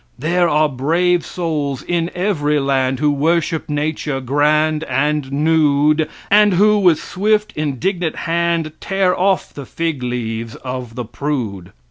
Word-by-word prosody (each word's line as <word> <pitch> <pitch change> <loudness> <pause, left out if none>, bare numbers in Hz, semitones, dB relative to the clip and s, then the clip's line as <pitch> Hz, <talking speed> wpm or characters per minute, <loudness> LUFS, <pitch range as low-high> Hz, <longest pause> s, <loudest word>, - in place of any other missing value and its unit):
There 170 +6 +1
are 155 +1 +3
brave 165 +6 +1
souls 150 -6 -3
in 170 -1 -1
every 155 -6 0
land 135 -1 0
who 150 +2 +2
worship 160 +2 0
nature 150 -1 -2
grand 150 +4 +1
and 150 -1 -1
nude, 150 0 +2 0.2
and 205 -2 +5
who, 210 +3 +4
with 180 -5 +4
swift, 215 +2 0
indignant 160 +4 -2
hand, 170 -1 -1
tear 195 -2 +1
off 190 0 0
the 140 -3 -9
fig 165 -5 -3
leaves 115 -2 -4
of 125 -3 -6
the 125 - -4
prude. 115 -8 -4
150 Hz, 135 wpm, -18 LUFS, 140-170 Hz, 0.2 s, and